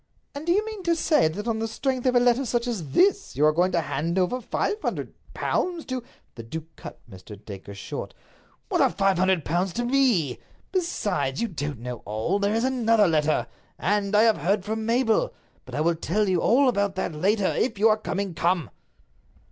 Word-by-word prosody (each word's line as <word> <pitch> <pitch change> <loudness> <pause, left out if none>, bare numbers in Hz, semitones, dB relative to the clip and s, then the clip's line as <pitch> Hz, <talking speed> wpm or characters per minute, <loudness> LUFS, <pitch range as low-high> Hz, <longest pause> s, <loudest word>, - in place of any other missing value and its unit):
"And 285 +3 -7
do - - +3
you 415 +4 +2
mean 435 -2 -6
to 340 -2 +1
say 305 - +3
that 205 +8 -5
on 225 -1 0
the 225 - -1
strength 260 +3 -2
of 250 - +2
a - - +7
letter 245 +2 +3
such 240 -1 -1
as 205 - -4
this 395 +2 +3
you 150 - +3
are 155 - +6
going 175 +4 +2
to 170 - +2
hand 165 +4 -2
over 190 +8 +1
five 420 - -2
hundred - - -3 0.2
pounds 350 -3 -1
to—" 255 -2 -3 0.3
The 115 - -8
duke 160 +8 -8
cut - - -10
Mr. 100 0 -11
Dacre 100 -1 -9
short. 100 - -6 0.5
"What - - +1
are - - +5
five 195 -2 +1
hundred 185 -4 +2
pounds 175 +3 0
to 240 - -2
me? 240 - +2 0.3
Besides, 210 - -1
you 235 - 0
don't 145 - -5
know 125 0 -5
all. 110 - -1
There 200 +1 +1
is 225 - +1
another 230 -5 +3
letter. 155 -6 +1 0.3
And 205 +2 0
I 210 - +6
have 225 -2 +4
heard 190 +5 0
from 220 +1 -3
Mabel. 240 - +2 0.3
But - - -8
I 150 - 0
will 170 +2 +3
tell 200 +6 0
you 185 -3 +1
all 270 +4 +4
about 200 -5 0
it 190 - -1
later. 195 +5 +1
If 250 - 0
you 215 +3 +5
are 215 - +3
coming, 200 -3 -3
come!" 170 0 0
205 Hz, 210 wpm, -25 LUFS, 165-245 Hz, 0.5 s, a